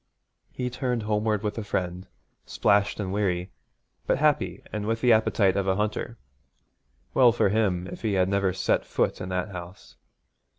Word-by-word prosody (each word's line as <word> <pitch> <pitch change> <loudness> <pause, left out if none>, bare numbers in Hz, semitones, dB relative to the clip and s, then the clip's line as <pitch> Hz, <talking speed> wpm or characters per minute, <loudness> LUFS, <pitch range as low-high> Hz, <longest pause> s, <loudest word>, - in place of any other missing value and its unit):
He 125 -1 -3
turned 125 -3 -2
homeward 105 0 0
with 105 +2 -2
a - - -4
friend, 90 -1 -3 0.4
splashed 100 0 +1
and 95 -2 -3
weary, 95 -3 -1 0.6
but - - +2
happy 150 +1 +1
and 105 -1 -3
with 115 0 0
the 125 -2 +5
appetite 110 -3 +3
of 100 -1 0
a 95 - +2
hunter. 110 +3 -2 1.0
Well 125 -3 +6
for 115 -3 +2
him 95 -4 +1
if - - -8
he 110 -3 0
had 95 -1 +2
never 100 -1 +1
set 95 +1 0
foot - - -1
in 90 - -5
that 90 +2 -2
house. 90 0 -10
105 Hz, 170 wpm, -26 LUFS, 95-110 Hz, 1.0 s, Well